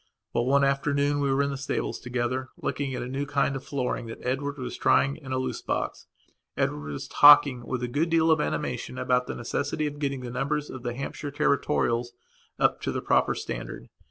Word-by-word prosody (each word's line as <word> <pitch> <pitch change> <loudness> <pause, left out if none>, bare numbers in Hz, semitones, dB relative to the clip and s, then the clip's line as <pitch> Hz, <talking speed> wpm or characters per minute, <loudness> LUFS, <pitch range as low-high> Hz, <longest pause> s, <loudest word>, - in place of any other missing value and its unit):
Well, 120 - +1
one 140 +1 +4
afternoon 140 +1 +1
we 140 -1 +1
were 135 +1 +3
in 140 - -1
the 140 - -4
stables 140 - -3
together, 125 +1 -2
looking 140 -2 -2
at - - -3
a - - -5
new 135 +3 -3
kind 140 -1 +1
of 135 - -5
flooring 125 -3 -2
that 115 - -9
Edward 140 +3 -1
was 130 -2 -5
trying 140 +1 +3
in 140 -4 -10
a 130 - 0
loose 130 - -3
box. - - -3 0.5
Edward 75 0 -1
was 70 - -6
talking 140 -4 +7
with 125 -1 -2
a - - 0
good 150 +7 0
deal 165 0 +4
of 160 -1 +4
animation 65 - -3
about 125 - +1
the - - -4
necessity 145 +5 -2
of 145 0 -4
getting 140 -3 -2
the 125 -1 -6
numbers 145 +4 -2
of 130 - -7
the 120 -1 -4
Hampshire 140 +2 -5
territorials 140 -4 +1 0.4
up - - +2
to - - -1
the - - -3
proper - - +2
standard. - - -6
135 Hz, 210 wpm, -27 LUFS, 125-145 Hz, 0.5 s, talking